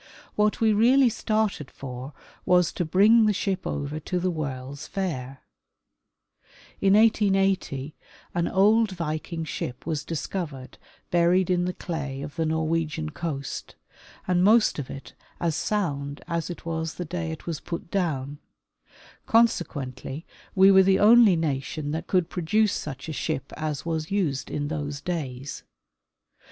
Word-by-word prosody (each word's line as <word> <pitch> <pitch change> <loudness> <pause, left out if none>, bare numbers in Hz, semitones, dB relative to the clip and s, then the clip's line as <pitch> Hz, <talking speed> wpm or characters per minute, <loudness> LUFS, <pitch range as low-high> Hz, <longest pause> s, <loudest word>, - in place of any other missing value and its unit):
What 210 0 +2
we 220 -1 +4
really 245 +5 +5
started 215 - -1
for 130 +1 -8 0.3
was 180 -2 +3
to - - -1
bring 210 +7 +5
the 210 - +3
ship 190 -1 -2
over 145 +2 -3
to 180 +4 -2
the 180 +1 0
World's 140 -3 -5
Fair, 135 -9 -4 1.4
In 195 0 +5
1880 195 -9 +2 0.4
an 170 0 0
old 210 +2 +3
Viking 165 0 -4
ship 125 -5 -5
was 155 -3 -2
discovered 150 -4 -5 0.3
buried 175 +2 +3
in 175 0 +2
the 180 - -2
clay 145 -7 -5
of 145 0 -8
the 165 -1 0
Norwegian 160 -1 -1
coast, 145 -5 -5 0.5
and 180 -1 +3
most 215 -3 +4
of 135 - -5
it 135 - -9 0.3
as 170 -3 0
sound 145 -10 -2
as 170 0 -2
it 175 - -8
was 160 -1 -3
the 180 - -4
day 170 0 -3
it 160 - -8
was 165 -3 -3
put 170 -1 -6
down; 145 -7 -1 0.9
consequently 150 - 0 0.3
we 195 0 +7
were 190 0 +8
the 190 0 +4
only 220 -2 +7
nation 150 -1 -2
that 160 +2 -4
could 180 -3 +2
produce 200 +5 +1
such 140 -1 -5
a 160 - -4
ship 135 - -3
as 155 -2 -3
was 160 -2 -2
used 170 -9 -1
in 145 -1 -2
those 145 -2 -4
days. 140 -5 -4
165 Hz, 145 wpm, -26 LUFS, 145-190 Hz, 1.4 s, were